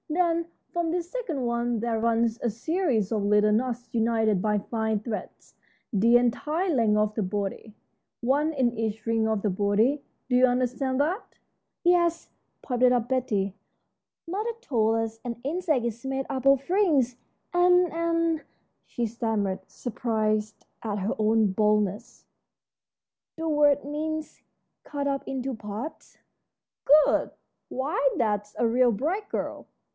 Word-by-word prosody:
Then, 335 0 +1 0.3
from 345 -1 0
this 345 0 -2
second 340 - -3
one 235 -1 0
there 230 0 -1
runs 230 0 +1
a 240 - +1
series 235 - 0
of 215 -3 0
little 210 +1 +4
knots 245 +2 -1
united 225 -4 +2
by 210 0 +1
fine 220 +1 -1
threads 215 0 -7 0.4
the 230 +4 +5
entire 300 +9 0
length 225 -5 +3
of 210 0 +1
the 220 - -2
body, 200 +2 -4 0.4
one 285 +6 +1
in 250 -6 0
each 220 -1 -3
ring 225 -1 +1
of 220 -2 0
the 210 - +1
body. 210 +9 +2 0.3
Do 250 - +1
you 255 +1 +6
understand 255 +2 0
that?" 345 +10 -1 0.5
"Yes," 345 -1 +2 0.3
piped 250 -1 -1
up 245 -2 +3
Betty, 215 -7 0 0.7
"mother 410 +7 -2
told 225 - +1
us 225 0 -3
an 235 -1 -5
insect 305 -4 0
is 235 0 -4
made 270 0 -2
up 265 -2 -3
of 275 0 +4
rings, 310 - +3 0.4
and 360 -1 +4
and 335 -1 0 0.2
" - - -47
she 240 - -2
stammered, 220 -4 -1
surprised 215 -3 -2 0.2
at 210 -2 -3
her 200 +2 -1
own 215 -1 +3
boldness, 210 -1 0 1.1
"the 325 0 -3
word 290 -2 +3
means 310 +1 -4 0.4
cut 285 -1 -3
up 275 -1 -1
into 265 0 -3
parts." 220 +6 -7 0.9
"Good! - - +1 0.4
Why, 275 +1 0
that's 210 -3 -1
a 235 - +2
real 245 +1 +4
bright 340 - -2
girl. - - -4
240 Hz, 140 wpm, -26 LUFS, 220-295 Hz, 1.1 s, you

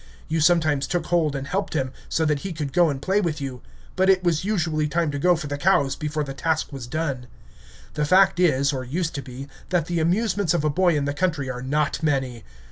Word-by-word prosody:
You 160 0 0
sometimes 155 -4 +3
took 175 -3 -1
hold 160 -4 +1
and 135 0 -4
helped 190 +3 -2
him, 130 -3 -1 0.2
so 160 - +1
that 150 -2 +1
he 190 +3 -5
could 150 -4 -4
go 175 -2 +4
and 140 -2 -3
play 190 +8 +1
with 160 -5 -2
you; 130 -3 -6 0.3
but 190 +1 +2
it 190 -1 +4
was 170 -1 +1
usually 160 -7 0
time 165 0 0
to 145 - -3
go 180 +4 +4
for 160 - -5
the 145 0 -4
cows 145 -6 +2
before 150 0 -2
the 135 -1 -6
task 160 +1 -1
was 130 -3 -7
done. 140 -4 -3 0.7
The 150 - -1
fact 185 +3 +4
is, 140 -5 +3
or 130 -1 -3
used 165 +7 -2
to 140 - -4
be, 135 +1 -9 0.2
that 175 -4 +1
the 170 0 -1
amusements 185 +1 +1
of 150 - 0
a 150 - +2
boy 175 0 +2
in 140 - -1
the 145 - -1
country 150 -5 -1
are 125 0 -6
not 145 +4 -1
many. 135 -7 -1
155 Hz, 235 wpm, -24 LUFS, 140-175 Hz, 0.7 s, go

